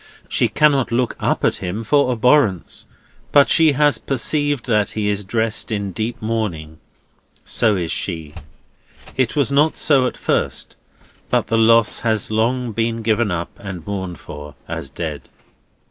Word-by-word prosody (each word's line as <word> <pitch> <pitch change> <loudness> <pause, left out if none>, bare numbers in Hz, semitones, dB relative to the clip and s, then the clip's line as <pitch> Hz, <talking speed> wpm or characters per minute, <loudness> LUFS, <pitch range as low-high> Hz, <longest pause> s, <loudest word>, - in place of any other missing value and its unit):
She - - +2
cannot 140 -6 +2
look 120 +1 0
up - - 0
at - - +1
him 95 +6 -4
for 140 +3 +2
abhorrence, 120 - +1 0.4
but 140 -1 +5
she 160 -3 +5
has 145 +1 +3
perceived 145 +1 -1
that 105 -4 +1
he 105 -1 0
is 105 0 -1
dressed 110 +3 -1
in 100 -2 -2
deep 115 +6 -4
mourning. 95 -9 -3 0.7
So 110 -3 +1
is 85 -3 -2
she. 80 -5 -3 0.8
It 130 -4 0
was 140 -2 +1
not 150 +3 +3
so 135 -4 +3
at - - -6
first; - - -2 0.5
but - - +1
the 115 - +1
lost 115 -1 +4
has 110 -2 0
long 120 +2 0
been 115 +1 -2
given 110 0 +1
up, 85 -1 -3
and 95 -5 -7
mourned 95 -4 -5
for, 75 0 -10
as 70 - -5
dead. 75 0 -6
110 Hz, 155 wpm, -20 LUFS, 95-125 Hz, 0.8 s, but